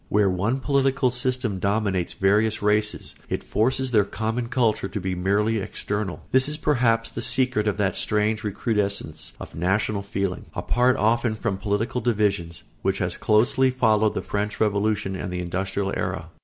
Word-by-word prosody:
Where 100 -2 +3
one 110 +9 -1
political 135 -2 +2
system 125 -5 -1
dominates 100 -3 0
various 105 +2 +2
races 105 0 0 0.2
it - - -2
forces 130 +3 0
their 105 -4 +5
common 110 +4 -3
culture 115 -6 +1
to 105 - -4
be 95 0 -3
external 100 +1 -1
merely. - - -17
This 130 +2 +3
is 150 - -2
perhaps 120 -6 +1
the 115 - -5
secret 125 -3 +2
of 105 - 0
that 95 -4 0
strange 105 +1 +1
recrudescence 100 -7 -2
of - - -9
national 100 +4 0
feeling, 100 -2 -3
apart 125 +1 +2
often 115 +1 +2
from 105 -3 -2
political 110 +5 -1
divisions, 100 -8 0 0.2
which - - 0
has - - -1
closely 120 +5 +3
followed 110 -4 +2
the - - -2
French 105 +1 -3
Revolution 105 -2 0
and 95 0 -4
the 90 - -3
industrial 95 +2 -2
era. 85 - -3
105 Hz, 160 wpm, -24 LUFS, 100-120 Hz, 0.2 s, their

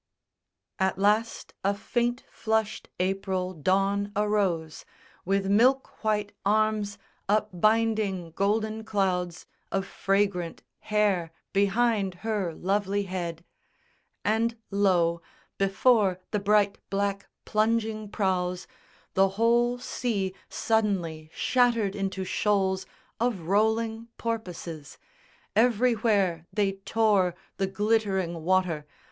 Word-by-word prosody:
_ - - +2
At 190 -1 +1
last 210 +3 +1
a 200 +1 +2
faint 240 +3 -1
flushed 220 -1 -1
April 185 0 -1
Dawn 195 +4 +1
arose 195 -7 0 0.4
With 195 +1 +1
milk 245 +8 +2
white 210 -1 0
arms 210 0 +1 0.3
up 210 +1 +2
binding 215 -3 +1
golden 215 +4 0
clouds 180 -5 -1 0.3
Of 195 0 0
fragrant 195 -4 -1 0.2
hair 205 -6 +1 0.2
behind 200 -1 +2
her 200 -7 -1
lovely 200 +2 0
head; 175 -3 -5 0.8
And 230 +2 +1
lo, 175 -4 +2 0.4
before 195 -1 +3
the 210 - +1
bright 205 0 +2
black 200 0 -1 0.2
plunging 215 -1 0
prows 180 -3 -1 0.5
The 195 0 +4
whole 240 +2 +3
sea 210 -6 -2 0.2
suddenly 185 -8 0
shattered 230 -5 +2
into 195 -1 -2
shoals 190 -1 0 0.3
Of 235 -5 0
rolling 220 +5 +1
porpoises. 180 -9 -5 0.6
Everywhere 215 -7 +2
they 205 -2 +1
tore 195 -2 +1 0.2
The 195 - 0
glittering 190 -4 0
water. 175 -4 +1
200 Hz, 100 wpm, -27 LUFS, 185-220 Hz, 0.8 s, The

